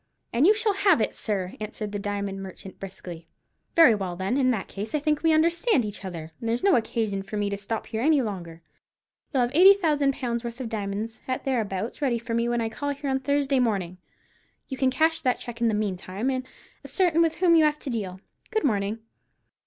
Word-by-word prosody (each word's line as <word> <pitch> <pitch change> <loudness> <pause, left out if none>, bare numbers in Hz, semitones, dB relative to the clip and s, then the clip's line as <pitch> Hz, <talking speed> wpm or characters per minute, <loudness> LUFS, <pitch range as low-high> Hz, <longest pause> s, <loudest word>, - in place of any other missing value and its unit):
"And 255 +8 +4
you 425 - +6
shall 430 -1 +2
have 390 - +4
it, 215 - 0
sir," 190 -3 -2
answered 215 -1 -5
the 205 - -3
diamond 200 -1 -3
merchant, 190 0 -9
briskly. 180 -4 -9 0.5
"Very 325 -8 +8
well, 190 -4 -3
then; 190 +6 -1
in 265 -2 +3
that 220 -6 -1
case 210 +7 -5
I - - +2
think 300 0 0
we 325 - +3
understand 335 - +3
each 205 -1 -5
other, 165 -4 -6
and 230 - -3
there's 235 +2 -1
no 395 - +5
occasion 220 -4 -1
for 205 +2 -6
me 205 -1 -1
to 200 - -2
stop 215 +2 -3
here 220 0 -4
any 300 +2 +4
longer. 175 -8 -5 0.7
You'll 265 -4 +2
have 240 - -1
eighty 380 +6 +8
thousand 295 -7 +1
pounds' 235 -2 -2
worth 235 +1 -6
of 250 -3 -4
diamonds, 215 +1 -4
at 255 -1 -3
thereabouts, 225 -3 -2
ready 255 -5 +1
for 230 0 -5
me 235 +1 +1
when 240 -1 0
I 225 - 0
call 285 +6 -4
here 280 -1 -3
on 265 - +1
Thursday 275 0 +1
morning. 195 -7 -1 0.7
You 265 - -4
can 260 0 +2
cash 320 +5 +2
that 250 -2 +1
cheque 235 -1 -8
in 235 - +3
the 220 - +1
meantime, 205 +3 -2
and 255 0 -3 0.4
ascertain 345 -4 +2
with 330 -1 +2
whom 350 -2 +4
you 320 - +6
have 300 0 +2
to 275 - -6
deal. 190 -5 -4 0.3
Good 435 -2 0
morning." 215 -4 0
235 Hz, 220 wpm, -26 LUFS, 200-285 Hz, 0.7 s, Very